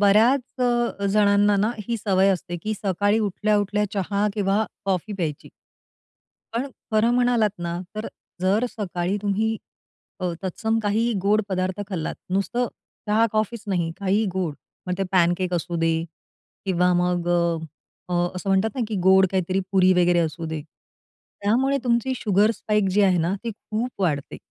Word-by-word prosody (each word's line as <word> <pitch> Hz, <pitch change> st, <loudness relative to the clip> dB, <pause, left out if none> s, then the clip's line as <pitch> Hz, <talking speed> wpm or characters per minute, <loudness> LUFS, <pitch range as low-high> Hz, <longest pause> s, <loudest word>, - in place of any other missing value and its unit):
बऱ्याच 220 Hz, +7 st, +5 dB, 0.3 s
अ, 240 Hz, -4 st, 0 dB
जणांना 205 Hz, 0 st, +4 dB
ना 210 Hz, +3 st, +2 dB, 0.2 s
ही 235 Hz, -, 0 dB
सवय 195 Hz, -2 st, +2 dB
असते. 175 Hz, -2 st, -1 dB
की 215 Hz, 0 st, -1 dB
सकाळी 205 Hz, +2 st, +1 dB
उठल्या, 210 Hz, 0 st, +1 dB
उठल्या 205 Hz, +1 st, 0 dB
चहा 200 Hz, +1 st, 0 dB
किंवा 205 Hz, +1 st, +1 dB, 0.2 s
कॉफी 195 Hz, +2 st, -1 dB
प्यायची. 165 Hz, -7 st, -4 dB, 1.1 s
पण 245 Hz, +4 st, -1 dB, 0.3 s
खरं 220 Hz, +2 st, +4 dB
म्हणालात 245 Hz, -3 st, +3 dB
ना, 170 Hz, 0 st, -3 dB
तर 215 Hz, +1 st, -4 dB, 0.3 s
जर 195 Hz, +5 st, +2 dB
सकाळी 185 Hz, -3 st, -2 dB
तुम्ही 215 Hz, +2 st, 0 dB, 0.6 s
अ, 180 Hz, -1 st, -1 dB
तत्सम 220 Hz, +4 st, -1 dB
काहीही 220 Hz, +3 st, +1 dB
गोड 210 Hz, +2 st, +3 dB
पदार्थ 185 Hz, 0 st, -1 dB
खाल्लातं. 180 Hz, 0 st, -4 dB
नुसतं 240 Hz, +5 st, 0 dB, 0.4 s
चहा-कॉफीचं 215 Hz, 0 st, +1 dB
नाही, 170 Hz, -3 st, 0 dB
काही 200 Hz, +3 st, +2 dB
गोड. 180 Hz, -5 st, -2 dB, 0.3 s
मग 180 Hz, -, -1 dB
ते 195 Hz, -, +1 dB
पॅनकेक 180 Hz, 0 st, +2 dB
असू 175 Hz, 0 st, -2 dB
दे 165 Hz, 0 st, +2 dB, 0.7 s
किंवा 180 Hz, -1 st, +3 dB
मग 175 Hz, -1 st, 0 dB, 0.8 s
अ, 180 Hz, -, -4 dB, 0.2 s
असं 185 Hz, -, -5 dB
म्हणतात 195 Hz, +3 st, +3 dB
ना -, -, -1 dB
की 215 Hz, -, -2 dB
गोड 190 Hz, 0 st, +6 dB
काहीतरी 190 Hz, 0 st, 0 dB
पुरी 185 Hz, -1 st, +5 dB
वगैरे 175 Hz, 0 st, +3 dB
असू 165 Hz, 0 st, -2 dB
दे. 160 Hz, -2 st, -4 dB, 0.8 s
त्यामुळे 260 Hz, +7 st, +2 dB
तुमची 235 Hz, +2 st, +1 dB
शुगर 210 Hz, -1 st, +3 dB
स्पाइक 210 Hz, -3 st, 0 dB
जी 205 Hz, +2 st, +3 dB
आहे 185 Hz, -3 st, +4 dB
ना 170 Hz, +4 st, +1 dB
ती 230 Hz, -, -1 dB
खूप 220 Hz, +3 st, -4 dB
वाढते. 145 Hz, -5 st, -1 dB
200 Hz, 150 wpm, -24 LUFS, 180-215 Hz, 1.1 s, गोड